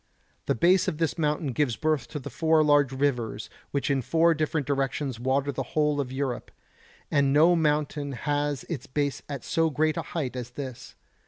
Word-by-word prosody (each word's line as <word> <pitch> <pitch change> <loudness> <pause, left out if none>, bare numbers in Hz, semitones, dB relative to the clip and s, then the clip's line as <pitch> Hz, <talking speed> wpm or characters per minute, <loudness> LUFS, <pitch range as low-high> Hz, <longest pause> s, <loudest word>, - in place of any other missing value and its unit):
The - - +2
base 180 +8 +4
of 150 - -1
this 165 +1 -1
mountain 150 -1 0
gives 125 -2 0
birth 155 -3 0
to 150 - -6
the 145 -1 -7
four 160 +3 +3
large 145 -3 +4
rivers 125 -6 -1 0.2
which 140 0 -1
in 135 -1 +1
four 165 +6 +3
different 155 -1 -1
directions 135 -2 -1
water 135 +3 0
the - - -3 0.2
whole 150 -1 +2
of 130 -2 -5
Europe; 130 -2 -3 0.6
and 140 -2 +3
no 160 +5 +5
mountain 150 -2 0
has 145 +2 -1
its 150 -7 -6
base 145 +1 -1
at 140 -4 -5
so 165 0 +1
great 155 +2 +1
a - - 0
height 145 -4 -4
as 125 -1 -5
this. 130 -1 -8
145 Hz, 185 wpm, -27 LUFS, 135-155 Hz, 0.6 s, no